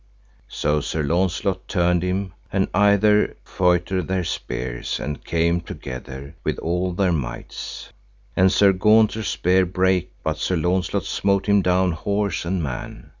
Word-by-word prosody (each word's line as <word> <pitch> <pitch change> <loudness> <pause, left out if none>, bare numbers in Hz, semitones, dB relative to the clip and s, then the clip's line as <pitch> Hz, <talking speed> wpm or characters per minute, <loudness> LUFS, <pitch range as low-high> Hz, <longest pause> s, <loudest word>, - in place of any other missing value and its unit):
So 75 0 0
Sir 75 +2 -2
Launcelot 85 +4 0
turned 90 0 +2
him, 95 +1 -2 0.2
and 95 -1 +1
either 105 +1 +4
feutred 90 +1 +1
their 95 -1 0
spears, - - -4
and 75 -2 -5
came 85 +1 +1
together 65 -2 -8
with - - -1
all 90 +2 -1
their 95 0 +1
mights, 70 -7 -5 0.4
and 95 0 +4
Sir 100 -1 +5
Gaunter's 110 +2 +3
spear 95 +2 +2
brake, 95 0 +1
but 80 -1 -2
Sir 95 - 0
Launcelot 90 +2 0
smote 100 -1 0
him 100 -1 +4
down 90 0 +2
horse 100 +3 -2
and 90 0 -1
man. 65 -4 -6
90 Hz, 140 wpm, -22 LUFS, 85-95 Hz, 0.4 s, Sir